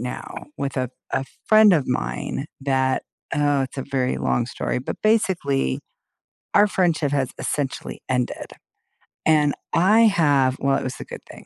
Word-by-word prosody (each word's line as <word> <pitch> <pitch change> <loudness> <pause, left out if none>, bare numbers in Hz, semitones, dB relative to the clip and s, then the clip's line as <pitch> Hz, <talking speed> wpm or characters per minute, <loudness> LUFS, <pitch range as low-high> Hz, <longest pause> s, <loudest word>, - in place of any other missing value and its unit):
now 125 +1 -6
with 140 -1 -3
a 130 -2 -1 0.2
a 135 - 0 0.2
friend 215 -1 +7
of 150 -6 +2
mine 65 - -3
that 130 -1 +1 0.3
Oh, 145 -2 +2
it's 130 - -6
a 135 - -3
very 130 -2 0
long 120 - +1
story, 120 - -3
but, 125 - -5
basically, 170 - +1 0.7
our 210 - +6
friendship 165 -7 +1
has 135 -3 0
essentially 140 -3 -3
ended, 125 -1 -2 0.7
and 150 -2 +3 0.2
I 195 +7 +4
have 145 - +3
Well, 140 0 +2
it - - -3
was 130 0 -5
a - - -7
good - - -9
thing. - - -12
140 Hz, 155 wpm, -23 LUFS, 130-165 Hz, 0.7 s, friend